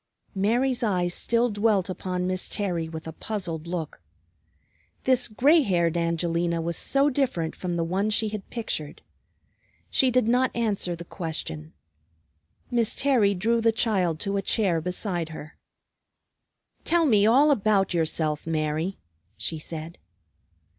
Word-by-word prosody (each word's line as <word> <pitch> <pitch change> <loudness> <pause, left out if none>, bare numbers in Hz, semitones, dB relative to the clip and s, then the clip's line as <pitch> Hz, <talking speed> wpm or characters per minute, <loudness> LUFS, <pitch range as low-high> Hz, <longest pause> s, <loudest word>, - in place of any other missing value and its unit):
Mary's 240 +6 +1
eyes 180 -6 0
still 235 +4 +2
dwelt 205 -3 +2
upon 180 -1 -3
Miss 185 0 -1
Terry 175 -6 -2
with 160 -1 -7
a 160 - -6
puzzled 170 -4 -5
look. 170 - -5 1.0
This 255 -1 +3
gray 285 +9 +4
haired 175 - +1
Angelina 170 0 0
was 170 +1 -2
so 280 +1 +2
different 245 - -1
from 180 -2 -3
the 170 - 0
one 190 +5 0
she 215 0 +1
had 210 -2 -7
pictured. 185 -11 -4 0.9
She 260 - +4
did 250 -2 +2
not 250 +2 +3
answer 205 -6 -1
the 170 +1 -9
question. 155 - -5 1.0
Miss 235 -2 +1
Terry 235 -8 +3
drew 230 +5 +1
the 225 0 +4
child 190 -8 +1
to 200 0 -1
a - - 0
chair 190 -7 +1
beside 180 -1 -2
her. 155 -1 -9 1.3
"Tell 340 0 +3
me 210 -7 +4
all 280 +6 +5
about 200 -6 +2
yourself, 160 -2 0
Mary," 160 +3 -1 0.4
she 160 - -2
said. 160 +1 -7
190 Hz, 140 wpm, -25 LUFS, 165-230 Hz, 1.3 s, all